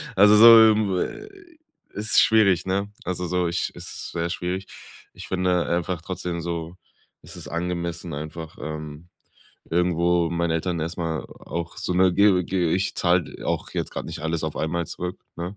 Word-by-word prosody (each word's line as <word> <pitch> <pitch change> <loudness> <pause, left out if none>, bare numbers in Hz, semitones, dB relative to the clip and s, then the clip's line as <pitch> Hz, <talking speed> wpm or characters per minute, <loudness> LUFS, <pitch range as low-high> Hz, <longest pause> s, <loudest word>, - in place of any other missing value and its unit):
also 105 +2 +7
so, 115 +1 +10
ähm 105 -3 0 1.0
ist 105 +2 +2
schwierig, 100 -6 +4
ne? 100 +2 -1
Also 90 0 -3
so, 90 0 0
ich 85 +1 -2
es - - -9
ist - - -7
sehr 85 0 -2
schwierig. 90 +3 -3 0.5
Ich - - -10
finde 90 -1 0
einfach 85 0 -1
trotzdem 90 -2 -4
so, 85 0 -4 0.5
es - - -12
ist - - -9
angemessen, 85 0 -4
einfach, 80 +2 -7
ähm, 75 +2 -7 0.6
irgendwo 85 0 +2
meinen 85 0 -1
Eltern 85 +1 -1
erst 80 +2 -4
mal 80 -2 -2
auch 85 -1 -7
so - - -3
'ne, 90 0 +4
ge 100 -3 +4
ge 90 -2 0
ich 95 +1 -1
zahle 90 -1 0
auch - - -2
jetzt - - -3
grad - - -5
nicht - - -7
alles 80 +1 -2
auf 80 - -4
einmal 85 +2 -2
zurück, 90 +4 -6 0.2
ne? 90 +4 -5
85 Hz, 170 wpm, -24 LUFS, 85-95 Hz, 1.0 s, so